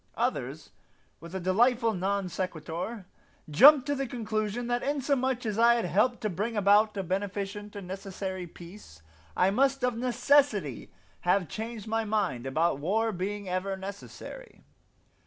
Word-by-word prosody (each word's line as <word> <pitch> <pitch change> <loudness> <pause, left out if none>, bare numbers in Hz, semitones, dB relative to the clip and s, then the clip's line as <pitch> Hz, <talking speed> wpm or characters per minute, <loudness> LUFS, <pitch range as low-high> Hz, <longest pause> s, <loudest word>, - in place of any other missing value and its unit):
Others, - - -2 0.5
with 170 +3 -10
a - - -1
delightful 230 +5 +2
non 195 +1 -1
sequitur, 180 +4 -4 0.4
jumped 265 - +7
to 285 - 0
the 275 -1 -2
conclusion 220 -1 -2
that 240 0 0
inasmuch 265 -3 0
as 215 0 -2
I 235 +1 +6
had 235 - -1
helped 215 +8 +1
to 215 - -1
bring 210 +6 -2
about 205 +1 +4
a 195 - -1
beneficent 200 +2 -4
and 200 -3 -7
necessary 190 -1 -5
peace 170 - -13 0.3
I 185 +2 +4
must 270 +4 +2
of 250 -2 +1
necessity 240 - +1 0.3
have 180 0 +1
changed 220 +2 -6
my 225 0 0
mind 200 - -1
about 155 +1 +1
war 220 +9 +1
being 200 +2 -4
ever 185 +2 -2
necessary. 200 - -9
205 Hz, 145 wpm, -28 LUFS, 185-235 Hz, 0.5 s, jumped